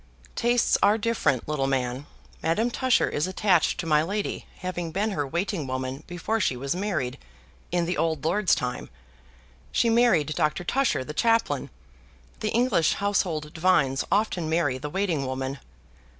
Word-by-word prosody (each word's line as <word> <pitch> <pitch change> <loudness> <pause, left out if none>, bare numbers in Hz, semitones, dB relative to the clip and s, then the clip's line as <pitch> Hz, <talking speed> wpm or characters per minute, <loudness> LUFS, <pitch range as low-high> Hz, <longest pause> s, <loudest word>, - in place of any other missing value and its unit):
"Tastes 240 0 +2
are 205 +2 +5
different, 205 - 0
little 145 -3 0
man. 130 0 -2 0.3
Madame 220 +9 +1
Tusher 260 0 +2
is 150 +4 -1
attached 185 -2 +2
to - - -2
my 150 -2 +4
lady, 200 +6 -3
having 180 -2 -4
been 205 +5 0
her 145 -7 -2
waiting 170 0 -2
woman 130 +2 -4
before 175 +6 -2
she 135 - 0
was 140 +5 -2
married, 175 -11 -2 0.5
in 175 -1 +1
the 175 +1 -2
old 160 -3 0
lord's 185 +4 +3
time. 125 0 -4 0.8
She 230 - +2
married 225 - +3
Doctor 150 +3 0
Tusher 255 - +1
the 150 - -7
chaplain. 225 - +1 0.7
The 215 - -1
English 230 -9 +2
household 175 -7 -1
divines 160 -6 +2
often 195 -6 +1
marry 150 -6 +1
the 150 +2 -5
waiting 165 -6 -1
women." 130 +1 -3
170 Hz, 150 wpm, -26 LUFS, 140-205 Hz, 0.8 s, are